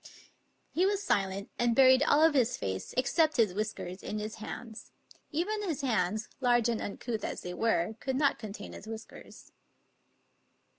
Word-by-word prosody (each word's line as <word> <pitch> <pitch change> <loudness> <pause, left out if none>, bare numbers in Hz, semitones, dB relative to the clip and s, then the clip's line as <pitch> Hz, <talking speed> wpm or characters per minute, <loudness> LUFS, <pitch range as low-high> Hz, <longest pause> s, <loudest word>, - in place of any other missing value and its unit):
He 350 - +1
was 405 0 0
silent, 195 - 0
and 240 -1 +2
buried 260 0 +7
all 295 +1 +4
of 320 -1 +6
his 250 -3 +2
face, 95 -1 -4
except 310 +4 +2
his 215 -6 +3
whis 215 +2 -1
kers, 180 +2 -8
in 210 - -4
his 215 +1 -5
hands. 220 +1 -8 0.4
Even 405 +8 -1
his 330 -8 -2
hands, 215 -4 0
large 240 -3 +3
and 230 - -1
uncouth 220 +1 -4
as - - -4
they 180 - -5
were, 220 -2 +1
could 265 -1 -2
not 280 +1 +2
contain 205 -2 -8
his 215 - -10
whiskers. 225 0 -10
230 Hz, 165 wpm, -30 LUFS, 210-275 Hz, 0.4 s, buried